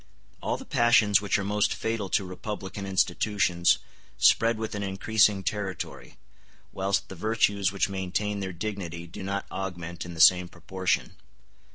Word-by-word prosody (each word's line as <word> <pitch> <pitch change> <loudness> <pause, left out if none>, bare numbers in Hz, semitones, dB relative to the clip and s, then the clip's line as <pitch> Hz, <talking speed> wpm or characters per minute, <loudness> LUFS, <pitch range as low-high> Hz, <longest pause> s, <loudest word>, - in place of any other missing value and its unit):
] - - -33
All - - -1
the 265 - -10
passions 120 - +4
which 100 - +1
are 100 - -2
most 105 +1 +1
fatal 110 -4 -2
to 100 - +1
republican 100 +1 -6
institutions 95 -1 +2 0.4
spread 115 0 +4
with 110 0 -4
an 105 - -3
increasing 100 +1 +2
territory, 95 -1 -4 0.6
whilst 95 +1 0
the - - -8
virtues 100 -1 +1
which 100 -1 0
maintain 100 +2 -2
their 95 -1 -3
dignity 85 -3 -5
do 85 - -10
not 100 +1 -3
augment 85 -3 -5
in 85 -1 -8
the - - -9
same 90 +2 +7
proportion. 95 +1 -2
100 Hz, 155 wpm, -27 LUFS, 90-105 Hz, 0.6 s, same